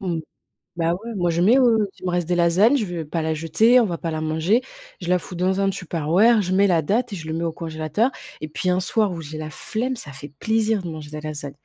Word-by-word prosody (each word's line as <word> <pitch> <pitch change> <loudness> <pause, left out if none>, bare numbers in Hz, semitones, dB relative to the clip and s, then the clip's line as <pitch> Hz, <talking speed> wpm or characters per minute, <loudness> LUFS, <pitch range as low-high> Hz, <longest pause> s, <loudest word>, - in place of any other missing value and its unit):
Mmh. 175 -4 -2 0.6
Bah 165 0 +1
ouais, 225 +5 -7
moi 175 -2 +1
je 170 +1 +1
mets, 230 +8 +5
heu 225 -5 +4
si - - -23
il - - -4
me 180 - +1
reste 175 -2 0
des 175 - 0
lasagnes, 175 +9 +4
je 215 - -1
vais 175 -2 -4
pas 165 +3 -3
la 160 0 -1
jeter, 165 +11 +4
on 240 - +5
va 175 -5 -3
pas 165 - -3
la 155 0 -3
manger, 160 +10 +1 0.4
je 175 - -3
la 180 - +4
fous 175 +2 -10
dans 185 +2 0
un 195 - +2
tupperware, 185 +4 +2
je 185 -2 -2
mets 200 +1 +4
la 175 -4 +3
date 215 - 0
et - - -3
je 160 -3 -8
le 160 - -3
mets 170 - -2
au 165 - -1
congélateur. 160 - -1 0.3
Et 155 - -5
puis 180 +4 -2
un 180 +1 +2
soir 205 +1 +1
où 165 - -5
j'ai 155 0 -8
la 155 0 -5
flemme 245 +10 -2
ça 145 -9 -8
fait 140 +2 -10
plaisir 220 0 +1
de 175 - -6
manger 155 -2 -8
de 155 - -7
la 155 0 -5
lasagne. 145 -2 -6
175 Hz, 285 wpm, -22 LUFS, 160-210 Hz, 0.6 s, mets